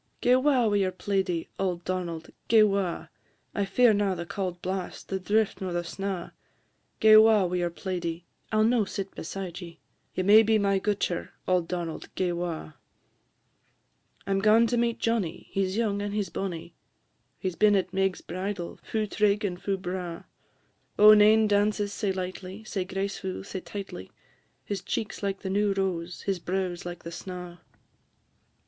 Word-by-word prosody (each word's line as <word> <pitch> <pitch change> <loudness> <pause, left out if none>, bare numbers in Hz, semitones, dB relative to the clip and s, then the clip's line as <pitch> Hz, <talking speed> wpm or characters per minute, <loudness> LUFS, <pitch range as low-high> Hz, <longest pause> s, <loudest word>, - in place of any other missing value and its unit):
"Gae 250 - +4
'wa 260 -2 +3
wi' 205 -2 +2
your 190 -2 +1
plaidie, 185 -3 -1
auld 180 -3 -1
Donald, 175 -3 -3 0.2
gae 220 -1 +6
'wa, 195 -4 0 0.4
I 200 - 0
fear 225 +4 +4
na 200 -2 +1
the 170 0 -5
cauld 180 -1 -4
blast, 185 0 -5
the 190 - -1
drift, 210 +3 +1
nor 185 -2 -3
the 175 0 -1
snaw; 190 0 -4 0.7
Gae 215 -1 +8
'wa 215 -3 +6
wi' 180 0 -1
your 175 -1 0
plaidie, 170 -1 -4 0.3
I - - -1
'll 215 - +5
no 230 0 +3
sit 195 -1 -5
beside 180 +1 -6
ye; 170 -1 -10 0.4
Ye 185 - 0
may 210 +3 +8
be 220 0 +3
my 200 -2 +2
gutcher; 200 -3 -1
auld 180 -2 +2
Donald, 170 -3 -4
gae 185 -2 0
'wa. 170 -3 -4 1.5
I 195 - -3
'm 195 - +2
gaun 215 +3 +5
to 240 - 0
meet 235 -1 +1
Johnnie, 200 -7 -1
he 195 - +1
's 190 +3 -4
young 205 -3 0
and 205 0 -3
he 210 - +1
's - - -9
bonnie; 175 -3 -5 0.6
He 185 - -2
's - - -13
been 210 +1 +4
at 185 -1 0
Meg's 195 -1 0
bridal, 185 0 -5
fu' 220 -1 -2
trig 210 0 +1
and 180 -2 -3
fu' 195 -1 -1
braw; 180 -2 -5 0.7
Oh, 210 +1 +9
nane 215 +1 +6
dances 205 0 +1
sae 200 -2 -1
lightly, 185 +2 -5
sae 195 -3 -3
gracefu', 190 0 -4
sae 195 -1 -5
tightly! 195 - -7 0.5
His 200 -3 -3
cheek 210 +3 -3
's - - -10
like 195 -1 -2
the 190 - -3
new 205 0 +2
rose, 180 -3 -2
his 195 -2 -1
brow 185 +1 -1
's 175 0 -8
like 175 0 -7
the 170 - -7
snaw." 180 0 -7
195 Hz, 180 wpm, -27 LUFS, 180-205 Hz, 1.5 s, Oh